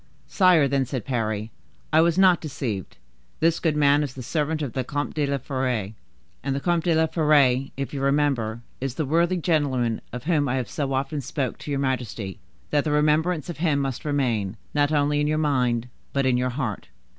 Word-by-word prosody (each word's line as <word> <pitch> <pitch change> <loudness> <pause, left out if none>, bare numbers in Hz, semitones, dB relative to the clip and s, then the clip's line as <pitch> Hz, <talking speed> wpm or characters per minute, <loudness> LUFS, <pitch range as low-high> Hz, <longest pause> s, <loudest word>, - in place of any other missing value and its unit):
"Sire," 180 -7 +4
then 135 0 +1
said 130 -4 -4
Parry, 110 -4 -2 0.4
"I 160 - +6
was 170 +1 +2
not 185 -2 +5
deceived. 120 - -4 0.4
This 165 +1 +2
good 155 -3 0
man 145 0 +4
is 140 -3 -4
the 130 - -7
servant 155 +3 -1
of 135 - -4
the 130 - -1
Comte 145 +3 -3
de 150 -2 0
la 140 0 0
Fere, 125 -6 -2 0.5
and 135 -1 -1
the - - -1
Comte 170 +2 0
de 170 -2 +3
la 160 0 +4
Fere, 145 -5 +3
if 140 +1 -4
you 140 - -3
remember, 135 -5 +1 0.2
is 135 -1 -3
the 155 - -1
worthy 170 +5 +2
gentleman 140 -9 0
of 125 0 -6
whom 150 -4 +1
I 130 - 0
have 125 -5 -3
so 140 -2 -2
often 135 +2 -1
spoken 130 -1 -3
to - - -8
your 140 -1 0
majesty 115 -7 -3 0.3
that 145 -1 +2
the 155 - -1
remembrance 155 +2 +2
of 175 - -6
him 155 -3 +1
must 135 -3 -2
remain, 120 -9 -1 0.2
not 145 0 +2
only 145 -1 +2
in 150 - +1
your 155 +1 +1
mind, 125 -6 +1 0.3
but 140 -1 +1
in 130 -1 +3
your 125 +1 +1
heart." 125 -5 -4
140 Hz, 205 wpm, -24 LUFS, 125-155 Hz, 0.5 s, I